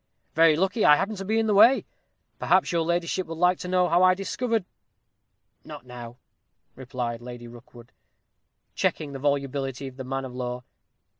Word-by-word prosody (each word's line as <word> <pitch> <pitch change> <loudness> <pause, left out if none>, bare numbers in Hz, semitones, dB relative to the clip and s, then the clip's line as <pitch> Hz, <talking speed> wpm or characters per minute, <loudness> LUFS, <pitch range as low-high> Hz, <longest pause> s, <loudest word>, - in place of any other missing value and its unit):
Very 165 -1 +5
lucky 190 +6 0
I 150 - +7
happened 200 +6 -2
to 195 - -5
be 220 +3 0
in 225 - +2
the 215 - +1
way. 225 +7 +6 0.5
Perhaps - - +2
your 170 -1 +1
ladyship 170 +2 -1
would 165 0 -7
like 180 +1 +2
to - - -6
know 180 0 +2
how 175 +1 +3
I 185 0 +5
discovered 225 +2 -2 0.5
" - - -50
"Not - - -11
now," 120 -1 -10 0.6
replied 125 -2 -5
Lady 120 0 -9
Rookwood, 120 0 -15 0.8
checking 145 -3 -2
the 135 - -6
volubility 140 -1 -2
of 130 -1 -9
the 130 - -6
man 135 +1 -4
of 125 - -9
law. 125 0 -5
150 Hz, 175 wpm, -25 LUFS, 125-185 Hz, 0.8 s, I